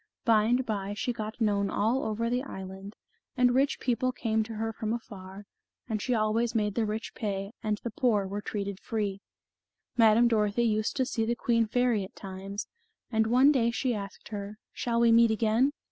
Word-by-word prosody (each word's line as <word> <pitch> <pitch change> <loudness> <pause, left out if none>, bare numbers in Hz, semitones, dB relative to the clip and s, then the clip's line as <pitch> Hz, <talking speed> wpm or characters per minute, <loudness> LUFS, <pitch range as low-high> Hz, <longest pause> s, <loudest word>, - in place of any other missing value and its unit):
By 220 -2 +5
and 245 +3 +2
by, 205 -2 -3
she 245 +3 -1
got 220 0 -6
known 200 -3 +1
all 225 +7 +1
over 220 +2 -1
the 245 +2 0
island, 190 -4 -8 0.4
and 250 -1 +4
rich 275 +2 +2
people 255 0 0
came 220 -3 0
to 225 0 -7
her 225 +1 -2
from 220 0 -2
afar, 200 -3 -8 0.4
and 215 -3 -2
she 250 +2 0
always 225 +2 +1
made 210 -2 +1
the 225 0 0
rich 215 +2 -4
pay, 195 -2 -3
and 215 -2 -1
the 235 - -3
poor 215 -4 +1
were 200 +2 -4
treated 200 -2 -4
free. 205 -4 -3 0.8
Madame 225 +1 +6
Dorothy 215 0 +2
used 215 -1 0
to 260 - +1
see 240 -3 -1
the 235 +2 0
queen 230 -1 +1
fairy 245 -2 +1
at 190 - -10
times, 195 +1 -6 0.5
and 220 -1 +2
one 255 +5 +6
day 240 -5 +2
she 245 +1 0
asked 200 -3 -7
her, 205 0 -6 0.2
"Shall 235 -1 -1
we 235 -1 +5
meet 230 0 +6
again?" 225 +4 +2
220 Hz, 190 wpm, -29 LUFS, 205-235 Hz, 0.8 s, Madame